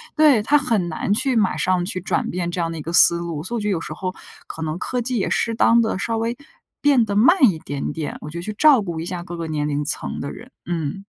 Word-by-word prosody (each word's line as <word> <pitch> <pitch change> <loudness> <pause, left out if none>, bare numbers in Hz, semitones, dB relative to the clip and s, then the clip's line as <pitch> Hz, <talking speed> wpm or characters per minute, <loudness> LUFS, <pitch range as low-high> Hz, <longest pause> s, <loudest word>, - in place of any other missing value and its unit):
对， 300 -7 +5
他 295 +7 +4
很 230 -10 0
难 160 +4 -3
去 255 +4 +1
马 210 -4 +1
上 185 -1 +1
去 185 -1 -3
转 180 - -2
变 175 -1 -3
这 175 0 -2
样 165 - -2
的 165 - -6
一 - - -6
个 165 +3 -6
思 170 0 +7
路， 170 -3 -5
所 210 +7 -4
以 - - -1
我 - - -5
觉 210 - -2
得 - - +1
有 170 -4 -1
时 155 - -6
候， 185 +3 -4 0.3
可 160 - -8
能 155 0 -3
科 250 +6 -3
技 250 +1 -2
也 200 - -1
适 230 - 0
当 230 +1 +4
地 220 -4 -1
稍 225 +3 -2
微 230 +2 -2 0.4
变 280 -5 +4
得 205 -2 -3
慢 300 - +4
一 165 - -6
点 140 -2 -4
点， 160 -3 -5
我 150 - -7
觉 170 - -8
得 - - -4
去 215 - -5
照 280 +2 +5
顾 170 -5 -5
一 - - -5
下 175 -1 -5
各 175 0 -8
个 165 -1 -5
年 150 -1 -2
龄 145 0 -1
层 150 - 0
的 140 - -5
人， 250 +3 -12
嗯。 175 +3 -4
185 Hz, 305 characters per minute, -21 LUFS, 165-230 Hz, 0.4 s, 思